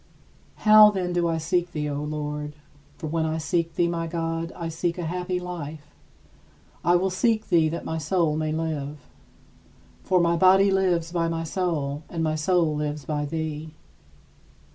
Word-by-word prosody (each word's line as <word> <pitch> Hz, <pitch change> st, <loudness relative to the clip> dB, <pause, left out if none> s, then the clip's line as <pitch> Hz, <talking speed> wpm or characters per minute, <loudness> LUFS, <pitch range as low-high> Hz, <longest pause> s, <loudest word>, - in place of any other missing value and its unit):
How, 215 Hz, 0 st, +9 dB
then, 185 Hz, -3 st, -2 dB
do 175 Hz, -1 st, +1 dB
I 165 Hz, -1 st, 0 dB
seek 175 Hz, +2 st, -1 dB
thee, 150 Hz, -1 st, -2 dB
O 145 Hz, 0 st, -3 dB
Lord? 150 Hz, 0 st, -4 dB, 0.4 s
For -, -, -7 dB
when 160 Hz, +1 st, -1 dB
I 160 Hz, 0 st, -1 dB
seek 165 Hz, +1 st, -1 dB
thee, 175 Hz, -, +2 dB
my 165 Hz, -1 st, -2 dB
God, 165 Hz, 0 st, -3 dB
I 170 Hz, -2 st, -4 dB
seek 170 Hz, +2 st, -2 dB
a 175 Hz, -, -3 dB
happy 180 Hz, +2 st, -2 dB
life. 160 Hz, -4 st, -7 dB, 0.9 s
I 175 Hz, +2 st, +4 dB
will 185 Hz, +2 st, +1 dB
seek 220 Hz, +3 st, +1 dB
thee 165 Hz, -4 st, +4 dB
that 170 Hz, -, -5 dB
my 160 Hz, 0 st, -2 dB
soul 160 Hz, 0 st, +1 dB
may 155 Hz, 0 st, -1 dB
live. 155 Hz, -2 st, -3 dB, 1.1 s
For 185 Hz, -, +2 dB
my 170 Hz, 0 st, +3 dB
body 190 Hz, +3 st, +5 dB
lives 180 Hz, -4 st, +1 dB
by 170 Hz, -1 st, 0 dB
my 165 Hz, 0 st, -2 dB
soul, 155 Hz, -5 st, -2 dB
and 165 Hz, -1 st, -3 dB
my 155 Hz, -1 st, +1 dB
soul 160 Hz, 0 st, +1 dB
lives 150 Hz, -1 st, -3 dB
by 150 Hz, -1 st, -2 dB
thee. 155 Hz, 0 st, -4 dB
165 Hz, 170 wpm, -25 LUFS, 155-175 Hz, 1.1 s, How